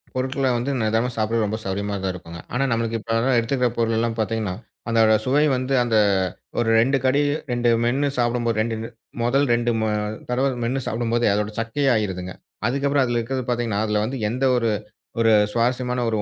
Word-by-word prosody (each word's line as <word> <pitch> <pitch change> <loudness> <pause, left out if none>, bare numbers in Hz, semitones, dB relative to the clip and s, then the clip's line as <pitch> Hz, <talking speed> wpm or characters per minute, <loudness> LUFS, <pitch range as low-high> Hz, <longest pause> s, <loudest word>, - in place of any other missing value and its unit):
பொருள்களை 130 +1 0
வந்து 125 +4 -2
நிதானமா 110 +3 +1
சாப்பிட 115 +1 0
ரொம்ப 105 +1 -2
சௌகரியமாத்தான் 100 0 -2
இருக்கும். 85 -1 -9 0.2
ஆனா, 125 +3 +1
நமக்கு 115 0 0
இப்ப 110 - -16 0.3
எடுத்துக்கிற 125 +2 +1
பொருள்லாம் 115 0 0
பார்த்தீங்கன்னா, 110 -3 -1 0.4
அந்த 115 0 +2 0.3
சுவை 140 +4 +3
வந்து 130 +1 -2
அந்த 115 -2 +1 0.6
ஒரு 120 -1 +1
ரெண்டு 135 +4 +3
கடி, 135 +3 +3 0.3
ரெண்டு 120 0 +1 0.2
மென்னு 135 +4 +1
சாப்பிடும்போது, 115 -2 0 0.5
முதல் 135 +4 +2
ரெண்டு 120 0 +1 0.6
தடவை 130 +3 +1
மென்னு 130 +3 -1
சாப்பிடும்போதே 120 +1 0
அதோட 105 +1 -1
சக்கையா 135 +5 +1
ஆயிடுதுங்க. 95 -4 -2 0.3
அதுக்கப்புறம் 140 +2 +1
அதுல 120 -1 0
இருக்கிறது 130 +2 -3
பார்த்தீங்கன்னா, 120 -4 0
அதுல 105 0 +1
வந்து 130 +3 -4
எந்த 125 +4 -3 0.8
ஒரு 115 -1 +4 0.2
சுவாரஸ்யமான 125 +1 0
120 Hz, 150 wpm, -23 LUFS, 110-130 Hz, 0.8 s, ஒரு